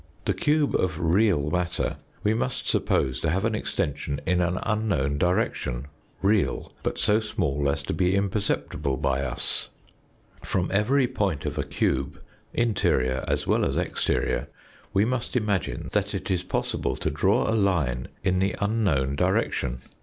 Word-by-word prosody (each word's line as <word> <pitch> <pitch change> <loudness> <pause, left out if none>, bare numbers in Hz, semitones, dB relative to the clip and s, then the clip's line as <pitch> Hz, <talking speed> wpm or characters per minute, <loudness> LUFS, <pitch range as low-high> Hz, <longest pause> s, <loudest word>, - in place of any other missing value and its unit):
The - - +2
cube 150 -1 +2
of 85 -4 0
real 85 -3 +2
matter 90 0 -1 0.3
we 105 - +3
must 125 +3 -2
suppose 65 -1 +1
to 80 - 0
have 95 +7 +1
an 115 - +1
extension 75 -8 -2
in 90 +1 +2
an 90 +1 +1
unknown 90 -11 0
direction, 70 -7 0 0.4
real, 100 0 +1
but - - -2
so 105 +1 +3
small 100 -11 -1
as 70 0 -1
to - - -3
be 90 +3 +2
imperceptible 95 -8 -1
by 70 -2 0
us. 65 - -2 0.7
From 90 -1 -1
every 125 +7 +3
point 100 - -1
of - - -2
a - - +1
cube, 70 +2 -1 0.3
interior 65 - +1
as - - 0
well - - +2
as - - 0
exterior, - - 0 0.4
we 100 +2 +3
must 125 +1 -2
imagine 105 -8 -1
that - - 0
it - - -3
is 90 -2 +1
possible 90 - -1
to 80 - -2
draw 100 - +2
a 110 - +1
line 85 - +1 0.2
in 90 0 +2
the 95 0 +1
unknown 95 -11 +1
direction. 65 -3 +1
90 Hz, 155 wpm, -26 LUFS, 70-105 Hz, 0.7 s, we